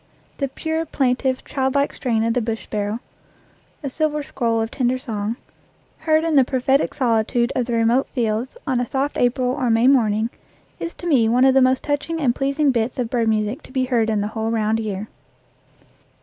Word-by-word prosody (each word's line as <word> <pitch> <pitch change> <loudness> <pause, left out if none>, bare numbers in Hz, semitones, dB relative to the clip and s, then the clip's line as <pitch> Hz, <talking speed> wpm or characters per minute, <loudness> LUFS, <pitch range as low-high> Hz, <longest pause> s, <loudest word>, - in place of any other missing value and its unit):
The 275 - 0
pure, 320 +4 -3
plaintive, 260 -1 0
child 265 -1 -1
like 280 0 +1
strain 230 -4 0
of 230 0 +1
the 250 - +1
bush 225 0 -3
sparrow 210 +2 -3 0.8
a 280 - -2
silver 300 0 -1
scroll 230 -4 -1
of 225 0 -2
tender 255 -1 0
song 225 -4 -3 0.6
heard 315 0 +2
in 325 -2 0
the 270 - +7
prophetic 265 +2 +1
solitude 235 0 +1
of 245 -2 0
the 240 - -2
remote 230 +4 +2
fields 235 - -2
on 255 -3 0
a 245 - -2
soft 275 +4 -1
April 250 +1 +1
or 255 -1 0
May 225 +2 +4
morning 225 -4 +3 0.5
is 335 - -5
to - - -10
me 245 -9 +4
one 250 +3 +4
of 265 - +5
the 270 - +5
most 260 0 +3
touching 295 +3 -2
and 260 -6 +2
pleasing 275 +2 +1
bits 235 -1 -1
of 240 -3 -2
bird 235 -2 +1
music 215 +2 0
to - - -15
be 260 -1 0
heard 235 -3 +1
in 215 -2 +1
the 205 - -2
whole 220 0 -3
round 220 -1 +1
year. 210 -1 -4
250 Hz, 200 wpm, -21 LUFS, 225-270 Hz, 0.8 s, the